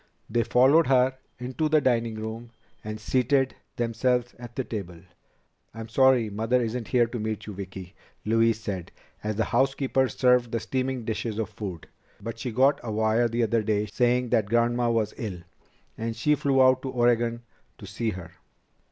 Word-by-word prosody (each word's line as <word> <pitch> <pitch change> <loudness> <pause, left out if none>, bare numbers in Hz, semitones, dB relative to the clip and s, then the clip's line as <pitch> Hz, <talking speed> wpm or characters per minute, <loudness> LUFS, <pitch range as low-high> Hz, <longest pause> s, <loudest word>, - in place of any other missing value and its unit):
They 120 +1 +2
followed 135 +8 +4
her 130 0 +3 0.2
into 130 +5 -2
the 155 0 +5
dining 115 -4 +1
room 110 +2 -6 0.3
and 110 0 -5
seated 130 +4 +1 0.2
themselves 120 +1 0
at 120 -1 -10
the 130 - -1
table. 95 -8 -6 0.8
"I'm 115 0 -7
sorry 130 -1 +4
Mother 110 +4 0
isn't 115 -1 -3
here 120 -2 +3
to 120 +1 -5
meet 110 -1 -3
you, 105 - -7
Vicki," 95 -1 -8 0.3
Louise 115 0 +2
said, 100 -6 -5 0.3
as 105 0 -2
the 110 - 0
housekeeper 135 -1 +1
served 125 0 +2
the 115 - 0
steaming 130 +1 -2
dishes 110 -1 -3
of 110 -3 -3
food, 95 -6 -7 0.3
"but 115 +2 -7
she 125 0 -3
got 135 +5 +3
a 115 - -5
wire 110 +2 +2
the 115 +1 0
other 115 0 +1
day 105 -1 0
saying 125 +3 +1
that 110 -3 +2
Grandma 120 +1 +2
was 115 -2 0
ill, 95 -6 -5 0.6
and 115 0 -3
she 150 +7 +2
flew 135 -2 +3
out 130 0 +4
to 135 - -4
Oregon 120 -1 +1 0.3
to 105 - -11
see 105 +4 -3
her." 95 -4 -7
115 Hz, 175 wpm, -26 LUFS, 110-125 Hz, 0.8 s, the